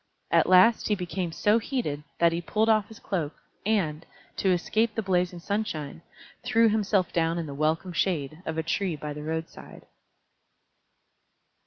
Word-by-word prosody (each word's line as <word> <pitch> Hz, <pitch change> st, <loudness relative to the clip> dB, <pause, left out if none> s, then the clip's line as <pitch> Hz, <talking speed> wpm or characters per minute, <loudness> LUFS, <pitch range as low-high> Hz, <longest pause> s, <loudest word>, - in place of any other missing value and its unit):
At -, -, +4 dB
last 185 Hz, +5 st, +6 dB
he 210 Hz, -, +2 dB
became 180 Hz, -1 st, -3 dB
so 210 Hz, +7 st, +2 dB
heated 205 Hz, -, -3 dB
that 170 Hz, -1 st, +4 dB
he 170 Hz, +1 st, -2 dB
pulled 220 Hz, +5 st, +1 dB
off 215 Hz, -2 st, +3 dB
his 220 Hz, -, -13 dB
cloak, 160 Hz, -6 st, -3 dB, 0.3 s
and, 170 Hz, -8 st, 0 dB, 0.3 s
to 195 Hz, -, +1 dB
escape 215 Hz, +5 st, +1 dB
the 225 Hz, -, -1 dB
blazing 180 Hz, -2 st, 0 dB
sunshine, 170 Hz, -6 st, -3 dB, 0.4 s
threw 230 Hz, -2 st, +4 dB
himself 205 Hz, -3 st, +1 dB
down 165 Hz, 0 st, +1 dB
in 170 Hz, -, -2 dB
the 145 Hz, -, -7 dB
welcome 160 Hz, +5 st, -1 dB
shade 155 Hz, -3 st, -1 dB
of 160 Hz, -2 st, -4 dB
a 160 Hz, -, 0 dB
tree 175 Hz, +1 st, -1 dB
by 150 Hz, 0 st, -6 dB
the 150 Hz, -, -7 dB
roadside. 160 Hz, +2 st, -6 dB
180 Hz, 160 wpm, -27 LUFS, 160-210 Hz, 0.4 s, last